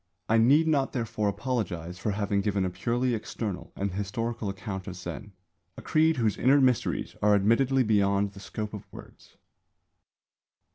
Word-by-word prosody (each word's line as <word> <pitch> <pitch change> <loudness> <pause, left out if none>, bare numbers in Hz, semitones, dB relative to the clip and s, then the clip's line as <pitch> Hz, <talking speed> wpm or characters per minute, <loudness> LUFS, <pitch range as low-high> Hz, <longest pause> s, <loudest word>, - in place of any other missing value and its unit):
I 115 +1 +4
need 145 +8 +5
not 140 -4 +1
therefore 115 -4 -1
apologise 95 -7 -3
for 105 - -2
having 100 0 0
given 100 -1 0
a 90 - -2
purely 120 +8 0
external 105 -3 -4
and 100 0 -2
historical 105 +3 -3
account 95 -1 -6
of 95 - -5
Zen, 90 +3 -7 0.5
a - - -9
creed 160 +1 +3
whose 110 -5 0
inner 135 +3 +5
mysteries 130 -3 +1
are 105 0 +5
admittedly 125 +6 +3
beyond 100 -2 +2
the 100 - -12
scope 105 +2 -6
of 100 -2 -9
words. - - -14
105 Hz, 155 wpm, -28 LUFS, 100-120 Hz, 0.5 s, need